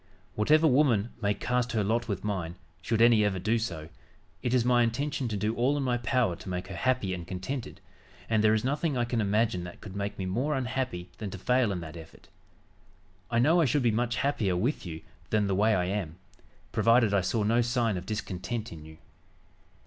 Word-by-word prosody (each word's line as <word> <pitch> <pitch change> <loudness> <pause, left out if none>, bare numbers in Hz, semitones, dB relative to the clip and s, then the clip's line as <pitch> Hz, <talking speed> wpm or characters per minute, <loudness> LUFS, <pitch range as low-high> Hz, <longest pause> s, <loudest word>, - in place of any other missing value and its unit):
Whatever 155 +10 +3
woman 125 -7 +3
may 100 -1 +1
cast 125 0 -1
her 110 -2 +1
lot 115 +4 0
with 100 - -3
mine, 90 -5 -3 0.3
should 115 0 +2
any 115 -2 +6
ever 100 -2 +1
do 110 +6 +1
so, 85 -9 -4 0.5
it 120 - -1
is 125 -2 +2
my 125 -1 +4
intention 130 +3 -1
to 105 -2 -2
do 105 +2 0
all 130 +5 +1
in 140 - -1
my 120 -2 0
power 120 -5 +1
to - - -9
make 90 0 -4
her - - -6
happy 125 -7 0
and 85 -2 -6
contented, 95 +8 -5 0.5
and 110 -1 +2
there 110 0 +5
is 110 - -1
nothing 145 +2 0
I 120 - +1
can 120 -1 -1
imagine 105 -3 +1
that 90 - -10
could 100 -3 -10
make 100 +1 -3
me 95 - -3
more 125 +11 -1
unhappy 125 -8 -3
than 105 - -4
to 100 - -7
fail 125 +2 +2
in 90 -3 -3
that 80 -1 -8
effort. 80 -1 -14 1.0
I 115 - 0
know 160 +9 +4
I - - +4
should 135 +1 +1
be 120 - +3
much 120 +2 0
happier 110 -11 0
with 120 +1 -1
you 80 -1 -6 0.3
than 105 -1 +2
the 100 - 0
way 105 +3 +3
I 90 -1 +1
am, 90 -4 -3 0.6
provided 115 -2 +4
I 100 - +3
saw 95 +4 0
no 115 +3 +3
sign 120 -3 +1
of 90 +1 -6
discontent 110 +2 -4
in 80 -2 -9
you. 80 0 -13
110 Hz, 215 wpm, -28 LUFS, 95-125 Hz, 1.0 s, any